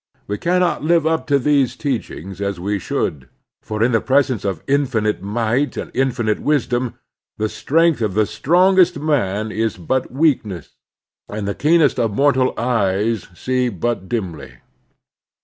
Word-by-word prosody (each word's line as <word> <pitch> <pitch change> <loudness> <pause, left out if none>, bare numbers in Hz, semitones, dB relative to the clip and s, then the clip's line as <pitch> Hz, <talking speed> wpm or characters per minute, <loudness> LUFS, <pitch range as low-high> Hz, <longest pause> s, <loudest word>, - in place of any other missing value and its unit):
We 105 0 -4
cannot 180 -2 +1
live 165 0 +3
up 160 0 0
to 145 -1 +3
these 140 -1 +2
teachings 100 - -4
as 100 -2 -2
we 100 +3 -2
should; 70 -6 -3 0.3
for 110 0 -2
in 125 - +3
the 115 - +2
presence 130 -5 +1
of 95 -5 -3
infinite 125 -8 0
might 115 +7 -1
and - - -5
infinite 120 -5 0
wisdom, 125 -4 0 0.4
the 110 - 0
strength 165 +4 +1
of 105 -4 -1
the 110 0 +3
strongest 180 - +3
man 110 -9 0
is 110 -2 -1
but 125 +9 -2
weakness, 120 - 0 0.6
and 105 -1 -4
the 100 - -1
keenest 155 +1 +3
of 110 -3 0
mortal 130 -1 +2
eyes 110 -2 0
see 125 +4 0
but 100 -1 -3
dimly. 95 - -4
120 Hz, 150 wpm, -19 LUFS, 105-145 Hz, 0.6 s, live